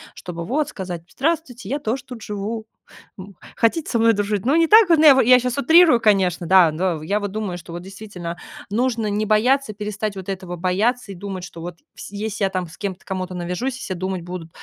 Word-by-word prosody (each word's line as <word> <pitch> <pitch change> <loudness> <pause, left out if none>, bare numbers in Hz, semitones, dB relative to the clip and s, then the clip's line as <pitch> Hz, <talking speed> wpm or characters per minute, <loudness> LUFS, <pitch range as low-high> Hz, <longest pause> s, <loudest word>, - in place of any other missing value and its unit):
чтобы 170 -1 -7
вот 285 - -1
сказать: 180 -3 -6
"Здравствуйте, 275 - -2
я 280 +7 -2
тоже 245 0 -3
тут 250 -4 -10
живу, 210 +2 -5 0.5
м, 195 0 -11 0.2
хотите 265 +7 +1
со 235 - +1
мной 230 0 +5
дружить?" 205 -1 -2
Ну, 275 +4 +3
не 330 0 +4
так 435 +2 +7
вот, 330 - +6
ну - - +4
я 285 -3 +9
во 265 - +5
я 250 +2 +7
щас 250 0 -2
утрирую, 320 -1 +6
конечно, 190 -6 +2
да, 185 -3 +6
но 165 -1 -2
я 200 +6 0
вот 205 -2 -4
думаю, 205 -4 -4
что 170 -1 -11
вот, 175 - -6
действительно, 190 -3 -8 0.3
нужно 230 +1 0
не 210 +1 -1
бояться, 240 +4 +2
перестать 210 0 -4
вот 190 0 -8
этого 185 -2 -5
бояться 200 +6 0
и - - -8
думать, 190 0 -6
что 170 - -10
вот 175 +1 -7 0.2
вс - - -9
если 210 0 -2
я - - 0
там 185 -2 -3
с 165 - -14
кем-то, 195 -3 -5
кому-то 185 -1 -4
навяжусь, 180 +9 -3
все 220 -7 -5
думать 185 0 -3
будут: 175 -1 -7
205 Hz, 220 wpm, -21 LUFS, 185-240 Hz, 0.5 s, я